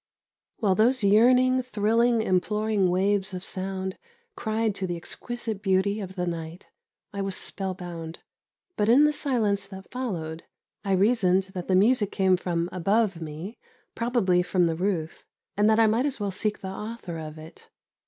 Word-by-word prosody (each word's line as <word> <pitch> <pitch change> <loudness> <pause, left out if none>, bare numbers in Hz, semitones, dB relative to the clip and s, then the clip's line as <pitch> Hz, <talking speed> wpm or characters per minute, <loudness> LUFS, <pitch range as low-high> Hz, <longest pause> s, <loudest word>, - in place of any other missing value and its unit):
While 205 -5 +2
those 230 +4 +3
yearning, 250 +5 +5
thrilling, 230 0 +2
imploring 210 +1 +1
waves 195 +1 +1
of 180 - -6
sound 190 0 -4 0.4
cried 220 -1 -1
to 195 -1 -3
the 175 -1 -3
exquisite 225 +4 -5
beauty 195 +2 +1
of 190 -2 -7
the 180 -1 -2
night, 170 0 -6 0.4
I 200 - -3
was 195 -1 -1
spell 190 -2 -4
bound. 170 -2 -7 0.6
But, 210 0 +1
in 260 +5 +7
the 300 0 +4
silence 215 -9 0
that 190 -1 -11
followed, 170 -11 -4 0.4
I 195 -2 0
reasoned 190 -2 +2
that 180 -2 -5
the 185 - +2
music 210 +1 +3
came 190 -2 +3
from 175 -2 -2
above 195 0 +1
me, 160 +8 -7 0.3
probably 230 -7 +1
from 180 0 +1
the 165 -1 0
roof, 175 -3 -2 0.3
and 210 +1 +3
that 220 - +4
I 225 - +6
might 245 +5 +1
well 200 -1 -2
seek 210 +3 -2
the 190 - -5
author 195 -4 -6
of 155 0 -8
it. 155 +1 -13
195 Hz, 165 wpm, -26 LUFS, 180-220 Hz, 0.6 s, in